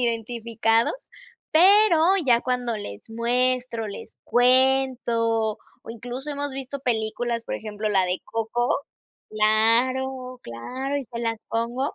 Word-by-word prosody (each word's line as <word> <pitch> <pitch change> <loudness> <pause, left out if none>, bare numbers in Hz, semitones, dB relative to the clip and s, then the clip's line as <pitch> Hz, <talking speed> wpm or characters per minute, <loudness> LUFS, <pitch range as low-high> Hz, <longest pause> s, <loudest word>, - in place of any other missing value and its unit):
identificados, 230 - 0 0.6
pero 380 +1 +6 0.3
ya 235 -2 +4
cuando 250 -2 -1
les 100 - -9
muestro, 245 0 0
les 200 - -10
cuento 245 -3 +2 0.2
o - - -9
incluso 245 +5 -7
hemos 285 0 -3
visto 270 +1 -5
películas, 230 -1 -2
por - - -4
ejemplo, 215 0 -4
la 195 -3 +3
de 180 +1 -2
Coco 225 +2 -2 0.6
claro, 250 +4 +1
claro. 255 - -5
Y 275 - -5
se 235 -1 -8
las 230 -1 -2
pongo 240 +5 -2
235 Hz, 120 wpm, -24 LUFS, 225-255 Hz, 0.6 s, pero